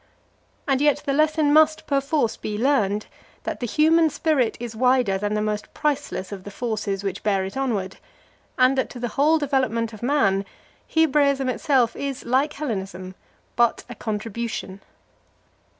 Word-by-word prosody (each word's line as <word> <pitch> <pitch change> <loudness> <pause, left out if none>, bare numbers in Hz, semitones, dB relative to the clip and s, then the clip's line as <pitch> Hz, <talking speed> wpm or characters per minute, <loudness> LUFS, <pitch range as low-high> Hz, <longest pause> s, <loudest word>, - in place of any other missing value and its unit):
And 270 -1 +2
yet 295 -1 +2
the 275 - 0
lesson 305 0 +2
must 310 0 +4
perforce 275 -4 0
be 210 -1 -5
learned, 215 -5 +1 0.4
that - - -4
the 245 - -3
human 320 +5 +4
spirit 290 -7 0
is 235 -1 -6
wider 250 -5 +2
than 205 +1 -1
the 210 - 0
most 210 -1 -3
priceless 290 -10 -2
of 195 -2 -7
the 205 - -8
forces 205 -3 -3
which 195 -2 -3
bear 195 -3 +1
it 190 - -7
onward, 220 -9 -2 0.6
and 255 +1 +4
that - - -1
to 245 - -9
the 240 0 -2
whole 300 +7 +3
development 255 -6 0
of 215 - -11
man 235 -7 +2 0.4
Hebraism 280 -4 +2
itself 255 -2 +1
is, 275 -2 -4
like 270 +5 +1
Hellenism, 190 -9 -5 0.4
but 235 -1 +2
a - - -6
contribution. 220 -2 -5
245 Hz, 155 wpm, -23 LUFS, 210-285 Hz, 0.6 s, must